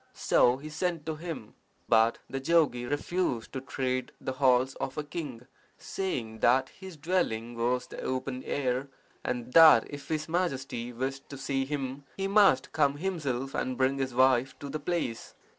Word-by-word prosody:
So 125 +1 +3
he 150 +3 -8
sent 165 0 -2
to 160 - -2
him. 160 -9 -7 0.3
But 115 0 +4
the 135 - -4
jogi 135 -5 +2
refused 145 -3 -2
to 130 - -3
tread 130 -1 -2
the - - -3
halls 130 -1 +3
of 135 - -4
a 150 - -1
king, 145 -6 -6 0.3
saying 115 -13 -4
that 130 +2 +3
his 190 -4 -11
dwelling 140 -8 -1
was 120 +2 0
the - - -9
open 130 0 -3
air, 130 -1 -1 0.4
and 125 0 -3
that 160 -1 +8
if 145 0 -9
his 155 -1 -2
Majesty 135 -8 -2
wished 135 +3 -4
to 140 - -7
see 135 0 -1
him 135 -1 -4
he 195 0 -1
must 195 -9 +4
come 145 -2 +2
himself 145 -7 -2
and 130 -1 -2
bring 135 +1 +1
his 130 -2 -2
wife 130 0 +3
to 140 - -7
the 155 - -3
place. 150 -7 -3
135 Hz, 170 wpm, -29 LUFS, 125-155 Hz, 0.4 s, that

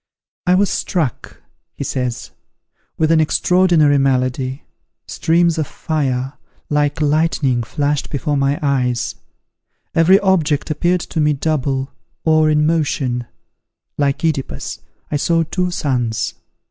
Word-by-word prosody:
"I 180 - +5
was 195 +1 +2
struck," 160 -10 -3 0.3
he - - -4
says, 125 -3 -3 0.7
"with 160 0 +2
an 160 -1 +5
extraordinary 160 -3 +3
malady. 130 0 0 0.4
Streams 170 0 +1
of 155 - -1
fire, 135 -4 -2 0.4
like 145 +1 +1
lightning, 150 -4 +1
flashed 145 +4 -1
before 145 +1 -1
my 140 +1 +1
eyes; 125 -4 0 0.8
every 175 +4 +5
object 165 -7 +1
appeared 175 +4 +1
to 160 - -4
me 150 0 +3
double, 135 -2 -1 0.3
or 155 -1 +4
in 150 0 +3
motion: 140 -6 0 0.7
like 140 -1 +1
Œdipus, 155 -5 -2 0.3
I 150 - +1
saw 165 +3 +2
two 180 +3 -1
suns. 125 -9 -1
150 Hz, 120 wpm, -18 LUFS, 135-165 Hz, 0.8 s, I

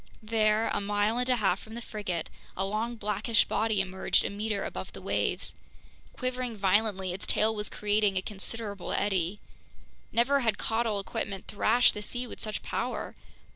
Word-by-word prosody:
There, 215 0 +3
a - - 0
mile 205 +3 +1
and 250 +1 +1
a 250 - +5
half 195 -5 +2
from 220 +1 -10
the - - -3
frigate, 185 -8 -4 0.3
a 190 - +1
long 220 +4 -1
blackish 210 +1 +2
body 220 -3 +1
emerged 190 0 +1
a - - -1
meter 205 0 -2
above - - -5
the - - -8
waves. - - -1 0.6
Quivering 255 -2 -3
violently, 195 -1 +2
its 190 - -5
tail 220 +1 +3
was 210 -1 -2
creating 205 -1 +1
a 185 - +1
considerable 205 -1 -4
eddy. 190 -1 +1 0.7
Never 265 +5 +4
had 225 -5 +1
caudal 225 -2 0
equipment 195 0 -4
thrashed 225 +4 +4
the 210 - -5
sea 245 +4 -3
with 240 - -9
such 215 -1 -3
power. - - -3
210 Hz, 170 wpm, -29 LUFS, 200-225 Hz, 0.7 s, a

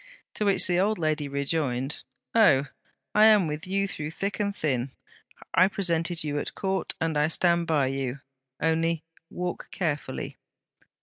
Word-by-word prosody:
To 210 - -1
which 200 -1 +3
the 175 0 +2
old 210 +3 +2
lady 155 -2 0
rejoined: 140 -1 -1 0.3
'Oh! 205 -12 +5 0.5
I 210 +1 +6
am 210 -4 +6
with 155 +3 -4
you 195 +1 0
through 155 -5 -5
thick 195 +5 -3
and 200 -1 -1
thin. 135 -6 -1 0.6
I 185 - +6
presented 170 -4 0
you 145 -1 -1
at - - -5
Court, 190 -1 -2
and 165 -1 0
I 150 - +3
stand 170 +1 +2
by 150 -4 +3
you. 135 0 -2 0.4
Only, 165 0 +1 0.3
walk 180 0 -4
carefully. 150 -6 -3
165 Hz, 150 wpm, -27 LUFS, 145-190 Hz, 0.6 s, I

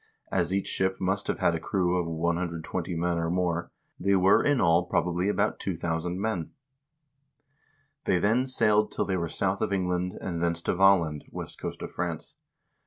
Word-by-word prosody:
As - - +1
each 100 0 0
ship 95 0 0
must 95 +1 -1
have - - -1
had 85 - +2
a 85 - -1
crew 90 0 0
of 90 -2 0
120 85 +1 -2
men 85 0 0
or 85 0 -1
more, 85 -1 -1 0.3
they 100 +2 +2
were 95 +1 +5
in 145 -2 +2
all 85 +1 +4
probably 90 +2 0
about 105 +1 0
2000 85 0 -2
men. 100 -6 -2 1.6
"They 90 - +3
then 115 +8 +2
sailed 105 -4 +3
till - - -1
they 95 - -1
were 85 -2 -2
south 95 +3 0
of - - 0
England, 90 -1 -1
and 85 -3 -4
thence 85 -1 +1
to - - +1
Valland 90 -5 +3
(west - - -7
coast - - -5
of - - -6
France). - - -4
90 Hz, 175 wpm, -27 LUFS, 85-95 Hz, 1.6 s, were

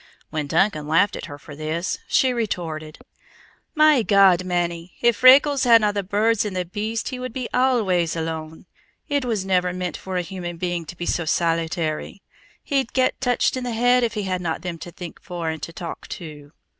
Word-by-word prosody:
When 150 -2 -2
Duncan 155 -1 +1
laughed 185 +6 +3
at - - -6
her 145 - -8
for 145 0 -12
this, 155 +4 -3
she 260 -1 +3
retorted: 165 -9 -4 0.8
"My 305 -4 +5
God, 195 -4 +5
mannie, 175 -1 -2
if 235 -3 +3
Freckles 275 +2 +6
hadna 230 -4 +5
the 200 - -1
birds 205 +3 +1
and 205 -3 -4
the 180 -1 -1
beasts 215 +7 -3
he 255 - -5
would 255 -2 -5
be 255 -2 -3
always 205 -11 +2
alone. 160 0 -5 0.4
It 285 -3 0
was 215 -6 -1
never 180 -1 +1
meant 180 -1 -4
for 190 -1 -5
a 180 - 0
human 175 -2 -6
being 175 -1 -2
to 175 - -10
be 175 - -4
so 170 - -1
solitary. 165 +2 -1 0.4
He'd 270 -4 -1
get 260 0 +1
touched 250 0 +1
in 255 - -3
the 245 -1 -3
head 245 +2 +3
if 230 -1 -1
he 210 - -2
hadna 180 -3 -2
them 175 -2 -6
to 175 - -8
think 175 0 -9
for 175 -2 -4
and 160 -2 -7
to 165 - -6
talk 170 0 -7
to." 150 -5 -11
185 Hz, 195 wpm, -23 LUFS, 165-230 Hz, 0.8 s, Freckles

